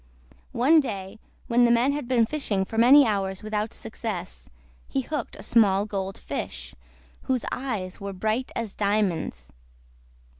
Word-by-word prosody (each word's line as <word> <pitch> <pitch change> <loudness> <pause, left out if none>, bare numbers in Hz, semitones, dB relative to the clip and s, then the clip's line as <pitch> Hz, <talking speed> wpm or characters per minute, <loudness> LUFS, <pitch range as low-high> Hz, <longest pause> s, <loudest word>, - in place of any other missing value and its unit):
One 290 +7 +5
day 200 -6 -4 0.3
when 240 +1 +3
the 240 - +5
man 240 +4 +3
had 285 -3 -4
been 240 -3 +3
fishing 220 -8 -1
for 225 - -9
many 275 +5 +8
hours 195 -3 -1
without 215 0 -2
success, 215 -5 -6 0.4
he 270 - -1
hooked 280 -1 -4
a - - -9
small 205 -3 +4
Gold 195 -2 -4
Fish, - - -6 0.6
whose 255 -3 +1
eyes 215 -10 -4
were 200 0 -4
bright 215 +6 -2
as 225 -4 -3
diamonds. 195 - -1
215 Hz, 145 wpm, -25 LUFS, 195-245 Hz, 0.6 s, many